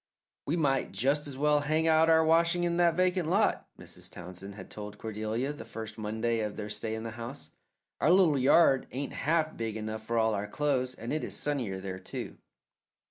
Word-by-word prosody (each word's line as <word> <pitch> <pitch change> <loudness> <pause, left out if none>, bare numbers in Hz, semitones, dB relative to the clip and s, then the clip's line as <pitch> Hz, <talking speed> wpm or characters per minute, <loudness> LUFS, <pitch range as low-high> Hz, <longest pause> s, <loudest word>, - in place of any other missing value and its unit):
"We 155 +5 +1
might 135 - +1
just 140 +9 +1
as 135 -2 -4
well 150 +1 +3
hang 155 +2 +1
out 160 0 +5
our 160 0 +5
washing 170 +2 +3
in 170 0 0
that 170 -2 +4
vacant 180 -2 +1
lot," 200 +5 +2
Mrs. - - -11
Townsend 90 +3 -9
had 95 -2 -10
told 105 -1 -8
Cordelia 110 +6 -3
the 145 - -9
first 110 0 -8
Monday 110 +2 -1
of 105 -2 -3
their 105 -1 -5
stay 110 +1 -3
in 110 - -5
the 115 - -5
house. 130 +5 -8 0.5
"Our 150 - +3
little 175 -6 +5
yard 135 0 +5
ain't 135 +3 -4
half 155 +1 0
big 115 -1 -3
enough 110 0 -4
for 115 +1 -2
all 110 -1 +3
our 105 0 -2
clothes, 130 0 0
and 115 +5 -5
it 155 - -1
is - - -4
sunnier 125 -10 -2
there, 95 -1 -6
too." 95 - -7
130 Hz, 200 wpm, -30 LUFS, 110-155 Hz, 0.5 s, out